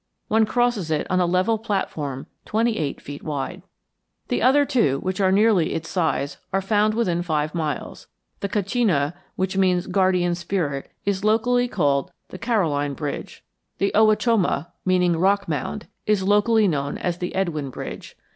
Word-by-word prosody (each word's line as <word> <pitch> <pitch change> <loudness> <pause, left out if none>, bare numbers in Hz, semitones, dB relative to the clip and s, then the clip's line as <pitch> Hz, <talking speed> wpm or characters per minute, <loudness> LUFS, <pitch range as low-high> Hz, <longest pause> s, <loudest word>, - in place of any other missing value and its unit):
One 220 0 +3
crosses 240 -8 +1
it 155 -2 0
on 185 - +3
a 180 - +2
level 185 +6 +2
platform 155 - -3 0.2
twenty 225 +1 0
eight 145 -3 -2
feet 145 0 -9
wide. 150 +4 -4 0.7
The - - 0
other 285 +3 +5
two, 220 - +2
which 185 +2 -2
are 190 -1 +4
nearly 200 -3 +3
its 165 0 -4
size, 160 -5 -1
are 195 - +2
found 210 +2 +2
within 180 -7 +1
five 155 -3 -1
miles. 155 -4 -4 0.3
The 200 - -3
Kachina, 195 - +1 0.2
which 190 +1 -1
means 185 -2 +2
Guardian 185 -2 +2
Spirit, 170 -5 -2 0.2
is 200 -1 -1
locally 245 +3 +2
called 145 - 0 0.2
the 185 - -9
Caroline 155 - 0
Bridge. 145 -1 -5 0.3
The 200 - +1
Owachomo, 215 - +2
meaning 180 -2 +3
Rock 200 +3 +2
Mound, 160 +7 -3 0.2
is 210 -3 +2
locally 210 +2 +4
known 140 -4 -1
as 175 -1 -2
the 180 - -4
Edwin 160 -7 -1
Bridge. - - -8
185 Hz, 155 wpm, -23 LUFS, 160-210 Hz, 0.7 s, other